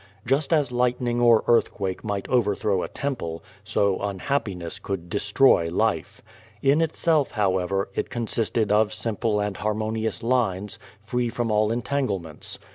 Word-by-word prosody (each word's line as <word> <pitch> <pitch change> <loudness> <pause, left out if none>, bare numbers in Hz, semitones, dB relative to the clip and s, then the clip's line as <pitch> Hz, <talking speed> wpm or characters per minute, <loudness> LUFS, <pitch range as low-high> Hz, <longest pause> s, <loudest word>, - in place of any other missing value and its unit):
Just 135 +4 +1
as 150 -6 +2
lightning 125 -1 0
or 115 -2 +5
earthquake 100 -5 +1
might: 100 -2 -3
overthrow 105 -5 +1
a - - -3
temple, 115 -13 -4 0.2
so 100 -2 +1
unhappiness 100 -3 -2
could 90 -3 -5
destroy 105 -3 +3
life. 85 - -1 0.4
In 140 +4 +4
itself, 160 -2 +1
however, 95 -2 0
it - - -2
consisted 115 -2 -1
of 105 0 +3
simple 110 -1 -1
and 105 -1 -2
harmonious 110 +1 -2
lines, 105 -5 0 0.2
free 120 +2 -1
from 115 -1 -2
all 105 0 +2
entanglements. 110 - -3
110 Hz, 130 wpm, -25 LUFS, 100-125 Hz, 0.4 s, or